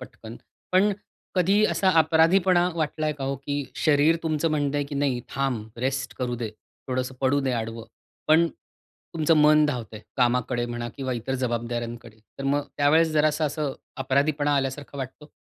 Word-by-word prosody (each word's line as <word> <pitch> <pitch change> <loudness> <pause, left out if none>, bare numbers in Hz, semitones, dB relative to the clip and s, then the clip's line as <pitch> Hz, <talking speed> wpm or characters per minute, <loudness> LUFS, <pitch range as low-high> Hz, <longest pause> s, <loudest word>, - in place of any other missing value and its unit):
पटकन. 115 -3 -10 0.4
पण 200 +3 +4 0.4
कधीही 195 +4 +3
असा 190 -1 +2
अपराधीपणा 175 +3 +4
वाटला 155 -1 -1
आहे 150 - 0
का 135 - -3
हो, 135 +1 -1
की 145 +1 -3
शरीर 155 +1 +3
तुमचं 160 0 0
म्हणतं 145 -1 0
आहे, 145 - 0
की 140 - -7
"नाही, 140 -3 0
थांब, 125 -5 -2
रेस्ट 130 0 -2
करू 125 -1 -1
दे, 115 -2 -3 0.4
थोडंसं 130 0 -2
पडू 140 +2 +2
दे 135 - -1
आडवं." 115 -1 -4 0.4
पण 165 +2 +6 0.7
तुमचं 160 0 +3
मन 150 0 +6
धावतं 120 -6 -4
आहे, 105 - -11
कामाकडे 125 -1 +1
म्हणा 120 0 -4
किंवा 130 -2 -3
इतर 125 +3 -3
जबाबदाऱ्यांकडे, 120 -2 -3 0.2
तर 135 - -5
मग 140 +1 +1
त्यावेळेस 155 +3 +4
जरासा 155 +1 +2
असं 150 -1 -2 0.2
अपराधीपणा 145 +2 +1
आल्यासारखा 140 +1 -3
वाटतो? 135 +3 -7
140 Hz, 165 wpm, -25 LUFS, 125-155 Hz, 0.7 s, पण